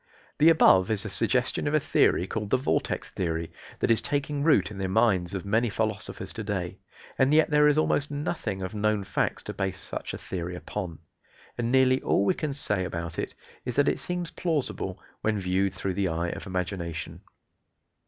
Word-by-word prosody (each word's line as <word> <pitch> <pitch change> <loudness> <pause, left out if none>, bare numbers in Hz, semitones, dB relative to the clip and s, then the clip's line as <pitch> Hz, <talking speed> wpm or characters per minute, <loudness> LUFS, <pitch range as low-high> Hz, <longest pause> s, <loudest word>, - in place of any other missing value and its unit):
The 155 +2 +7
above 95 - +6
is 110 -3 -1
a - - -4
suggestion - - +2
of 145 - +1
a - - +5
theory 90 - +3
called 105 +1 -4
"the 130 - +4
vortex 130 - -1
theory," 85 -2 -2 0.3
that - - +1
is 115 - +4
taking 145 0 -1
root 125 - +3
in 100 - -8
the 95 - -1
minds 100 -3 +2
of 95 - -4
many 110 +4 +2
philosophers 110 -1 -3
to 110 - -5
day, 95 -4 -3 0.4
and 130 +1 +4
yet 155 +1 +4
there 150 0 +5
is 150 0 +3
almost 145 -2 +2
nothing 145 - -3
of 95 - -4
known 105 -1 +1
facts 95 -1 -1
to - - -5
base 95 -1 -2
such - - -5
a - - -5
theory 90 -1 -5
upon, 90 -2 -5 0.6
and 120 0 -1
nearly 130 0 +4
all 100 - +2
we - - +3
can 155 -2 -3
say 105 -9 0
about 85 -2 -4
it - - -4 0.3
is 125 -2 -4
that 145 0 +3
it - - +1
seems 180 -1 -3
plausible, 140 - -2 0.2
when 110 -1 0
viewed 95 +1 0
through 95 0 -2
the 95 +1 0
eye 85 +1 -1
of 95 - -6
imagination. 85 -2 -4
105 Hz, 195 wpm, -27 LUFS, 95-135 Hz, 0.6 s, The